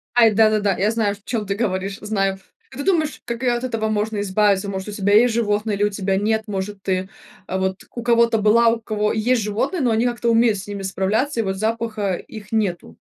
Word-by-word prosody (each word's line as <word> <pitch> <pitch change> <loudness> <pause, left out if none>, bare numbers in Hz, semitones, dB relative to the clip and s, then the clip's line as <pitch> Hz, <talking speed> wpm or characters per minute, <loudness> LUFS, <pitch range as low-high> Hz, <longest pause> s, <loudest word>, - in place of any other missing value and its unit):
Ай, 230 -2 +6
да-да-да, 210 -2 +3
я 205 +3 +2
знаю, 215 -3 0
в 200 - -23
чём 220 -2 -3
ты 200 0 -2
говоришь, 195 -2 -2
знаю. 195 -2 -1 0.3
А 265 - -11
ты 280 - -3
думаешь, 315 -5 0
как, 235 +1 -4
э, 250 - +3
от 240 +1 -2
этого 225 -4 -1
можно 215 0 -1
избавиться? 200 0 +1
Может, 190 +1 -5
у - - -5
тебя 205 -1 0
есть 230 +3 +5
животные 210 -2 0
или 200 - 0
у 210 - +3
тебя 195 -1 -1
нет? 220 +2 0
Может, 195 0 -5
ты, 185 0 -1 0.4
а, 190 - -2
вот 190 0 -2
у 240 - -4
кого-то 235 -1 +3
была, 220 +2 +4
у 230 0 0
кого 210 -1 -1
есть 230 +2 +1
животные, 225 - -1
но 250 - +2
они 225 +2 +2
как-то 240 -1 0
умеют 230 -2 +3
с 195 - -9
ними 200 -1 -5
справляться, 205 +8 -1
и - - +2
вот 190 -2 -2
запаха 220 -2 -1
их 210 +2 -11
нету? 180 - -2
215 Hz, 230 wpm, -21 LUFS, 200-230 Hz, 0.4 s, Ай